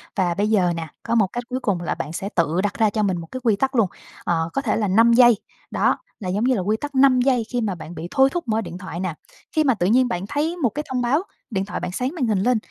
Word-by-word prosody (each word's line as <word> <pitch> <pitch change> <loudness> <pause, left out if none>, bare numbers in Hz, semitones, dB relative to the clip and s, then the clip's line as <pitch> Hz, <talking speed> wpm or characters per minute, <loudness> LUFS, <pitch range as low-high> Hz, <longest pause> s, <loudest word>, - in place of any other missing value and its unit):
Và 180 -3 +1
bây 205 +4 0
giờ 185 -5 +3
nè, 165 -1 -4 0.2
có 235 - -1
một 215 -4 +4
cách 240 - -3
cuối 255 0 -2
cùng 200 -8 -1
là 170 - -2
bạn 155 - -5
sẽ 195 +3 -4
tự 170 +1 +2
đặt 205 - 0
ra 220 -2 +4
cho 215 0 -1
mình 190 -3 +1
một 165 - -7
cái 255 - -4
quy 225 -4 +3
tắc 265 +6 -1
luôn, 225 -5 +4 0.4
ờ, 165 -1 0
có 275 - 0
thể 225 - +1
là 215 -2 0
5 230 +5 +5
giây, 240 -2 +7 0.3
đó, - - +2 0.2
là 190 -5 -4
giống 200 +4 0
như 255 +1 +3
là 200 - -1
quy 210 +4 0
tắc 290 +3 -6
5 260 -2 +5
giây 250 -3 +2
khi 245 - -1
mà 205 -4 -1
bạn 170 0 -9
bị 160 +2 -6
thôi 270 0 +4
thúc 350 -6 -3
mở 220 0 +1
điện 180 - -7
thoại 185 -2 -7
nè. 185 -2 -2 0.4
Khi 310 - +3
mà 265 -3 +3
tự 180 -5 0
nhiên 250 +5 +4
bạn 190 -5 -3
thấy 315 +4 -1
một 270 -9 +1
cái 300 +8 -5
thông 255 -1 -1
báo, 270 +8 +1 0.3
điện 195 -2 -1
thoại 210 - -4
bạn - - -4
sáng 250 +8 -2
màn 265 -8 0
hình 210 -3 +1
lên, 245 +5 +2
220 Hz, 300 wpm, -22 LUFS, 185-255 Hz, 0.4 s, giây